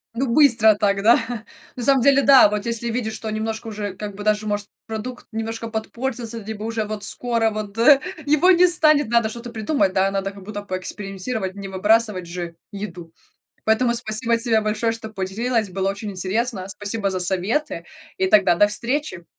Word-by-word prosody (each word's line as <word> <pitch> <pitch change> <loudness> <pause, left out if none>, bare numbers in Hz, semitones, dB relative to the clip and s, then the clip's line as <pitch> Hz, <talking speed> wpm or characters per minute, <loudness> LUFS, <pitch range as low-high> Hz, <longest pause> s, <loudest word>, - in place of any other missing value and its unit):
Ну, 265 +3 -1
быстро 235 -6 +5
так, 200 -1 +1
да. 230 +4 +6 0.6
На 245 - -5
самом 270 +1 +4
деле, 275 0 +5
да, 270 -4 +7
вот 210 +1 -3
если 235 0 -2
видишь, 225 -2 -2
что 220 0 -5
немножко 220 +1 -4
уже, 205 -3 -5
как 205 0 -7
бы, 205 - -7
даже, 215 0 +1
может, 205 -1 -2 0.2
продукт 225 +3 -6
немножко 225 +1 -4
подпортится, 230 +1 -4
либо 215 0 -7
уже 225 -1 -2
вот 210 -1 -5
скоро 230 0 +1
вот, 210 -2 -6
э, 270 +4 +7 0.3
его 305 +5 +5
не 360 0 +6
станет, 305 -5 +3
надо 235 -1 +2
что-то 235 +2 -7
придумать, 220 -3 0
да, 195 +1 +2
надо 195 0 -2
как 200 -1 -13
будто 205 +1 -6
поэкспериментировать, 195 +1 -5
не 200 -1 -7
выбрасывать 205 -1 +1
же 170 -1 -6 0.2
еду. 195 -5 -7 0.5
Поэтому 235 +2 +2
спасибо 230 0 0
тебе 230 -1 +1
большое, 215 +2 0
что 225 -1 -6
поделилась, 215 +3 -2
было 190 +1 -1
очень 200 +1 -5
интересно. 195 +2 -2
Спасибо 205 +1 -3
за 185 - -2
советы, 190 - -1 0.3
и 190 - +1
тогда 195 -3 +5
до 205 +4 +5
встречи. 235 - -2
220 Hz, 180 wpm, -22 LUFS, 200-235 Hz, 0.6 s, да